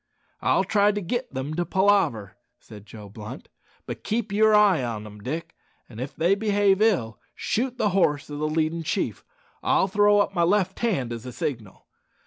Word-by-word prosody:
"I'll -, -, +2 dB
try 205 Hz, 0 st, +3 dB
to 205 Hz, -, -3 dB
git 240 Hz, +7 st, -3 dB
them 135 Hz, +3 st, -4 dB
to 175 Hz, +2 st, -1 dB
palaver," 180 Hz, -, +1 dB, 0.2 s
said 105 Hz, -1 st, -14 dB
Joe 105 Hz, -1 st, -11 dB
Blunt; 105 Hz, +2 st, -10 dB, 0.4 s
"but -, -, -7 dB
keep 220 Hz, -1 st, -2 dB
yer 215 Hz, +2 st, +4 dB
eye 200 Hz, -9 st, +4 dB
on 110 Hz, -3 st, -4 dB
'em, 105 Hz, 0 st, -11 dB
Dick, 160 Hz, +9 st, -5 dB, 0.3 s
an' 115 Hz, -2 st, -11 dB
if 130 Hz, +3 st, -6 dB
they 175 Hz, +4 st, +2 dB
behave 205 Hz, -1 st, +2 dB
ill, 150 Hz, -, +1 dB, 0.2 s
shoot 250 Hz, +2 st, -2 dB
the 210 Hz, -, +1 dB
horse 170 Hz, -7 st, +1 dB
o' 145 Hz, -, -7 dB
the 150 Hz, +1 st, -1 dB
leadin' 160 Hz, +1 st, 0 dB
chief. 160 Hz, -, -2 dB, 0.4 s
I'll -, -, +2 dB
throw 205 Hz, +1 st, +4 dB
up 205 Hz, -, +1 dB
my 175 Hz, -, 0 dB
left 185 Hz, +2 st, +1 dB
hand, 135 Hz, -, -1 dB
as 115 Hz, +1 st, -7 dB
a -, -, -6 dB
signal. 115 Hz, -6 st, -5 dB
170 Hz, 185 wpm, -25 LUFS, 125-205 Hz, 0.4 s, yer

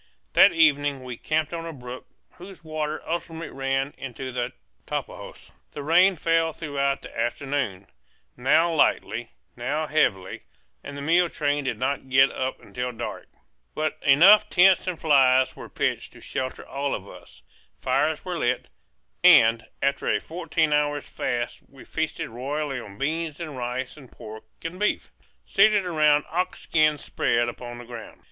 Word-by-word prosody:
That -, -, +7 dB
evening 145 Hz, -4 st, +2 dB
we 125 Hz, -1 st, -6 dB
camped 155 Hz, +5 st, -1 dB
on 165 Hz, 0 st, -4 dB
a -, -, -5 dB
brook 125 Hz, -3 st, -9 dB, 0.3 s
whose 180 Hz, -1 st, -12 dB
waters 155 Hz, -1 st, -4 dB
ultimately 165 Hz, 0 st, -4 dB
ran 135 Hz, +1 st, -1 dB
into 130 Hz, 0 st, -6 dB
the 120 Hz, -1 st, -3 dB, 0.4 s
Tapajos. -, -, -6 dB, 0.2 s
The 145 Hz, -, -6 dB
rain 180 Hz, +5 st, +5 dB
fell 165 Hz, 0 st, +1 dB
throughout 140 Hz, -3 st, -2 dB
the -, -, -11 dB
afternoon, 120 Hz, -4 st, -2 dB, 0.5 s
now 160 Hz, +7 st, +3 dB
lightly, 155 Hz, -, +1 dB, 0.3 s
now 140 Hz, +6 st, -2 dB
heavily, 95 Hz, -12 st, 0 dB, 0.4 s
and 140 Hz, -, -8 dB
the 140 Hz, -, -6 dB
mule 170 Hz, +3 st, +3 dB
train 145 Hz, -2 st, -1 dB
did 130 Hz, -, -2 dB
not 135 Hz, +1 st, -2 dB
get 135 Hz, +1 st, +5 dB
up 130 Hz, 0 st, -3 dB
until 125 Hz, 0 st, -5 dB
dark. 120 Hz, 0 st, -6 dB, 0.5 s
But 155 Hz, 0 st, -2 dB
enough 195 Hz, +10 st, +7 dB
tents 185 Hz, +1 st, +5 dB
and 180 Hz, -3 st, -3 dB
flies 130 Hz, -4 st, +4 dB
were -, -, -10 dB
pitched -, -, -2 dB
to -, -, -14 dB
shelter 130 Hz, 0 st, -5 dB
all 140 Hz, 0 st, -2 dB
of 100 Hz, -, -8 dB
us. 85 Hz, -10 st, -15 dB, 0.4 s
Fires 150 Hz, +6 st, 0 dB
were 180 Hz, -2 st, -3 dB
lit, 120 Hz, -, -1 dB, 0.5 s
and 115 Hz, 0 st, +6 dB, 0.2 s
after 140 Hz, 0 st, 0 dB
a -, -, +2 dB
fourteen 160 Hz, -2 st, -1 dB
hours' 145 Hz, -1 st, 0 dB
fast 120 Hz, -1 st, -3 dB
we 135 Hz, -, -15 dB
feasted 160 Hz, -1 st, -3 dB
royally 135 Hz, +3 st, -3 dB
on 100 Hz, -4 st, -11 dB
beans 155 Hz, +3 st, -2 dB
and 155 Hz, -4 st, -6 dB
rice 125 Hz, +2 st, -4 dB
and 135 Hz, -4 st, -14 dB
pork 110 Hz, 0 st, -11 dB, 0.2 s
and 170 Hz, +3 st, -5 dB
beef, 210 Hz, -, -1 dB, 0.3 s
seated 205 Hz, -1 st, +4 dB
around 150 Hz, -4 st, +3 dB
ox 180 Hz, +3 st, -2 dB
skins 155 Hz, -2 st, +2 dB
spread 120 Hz, 0 st, 0 dB
upon 120 Hz, 0 st, -7 dB
the 120 Hz, -, -10 dB
ground. 115 Hz, -2 st, -10 dB
145 Hz, 155 wpm, -25 LUFS, 125-160 Hz, 0.5 s, That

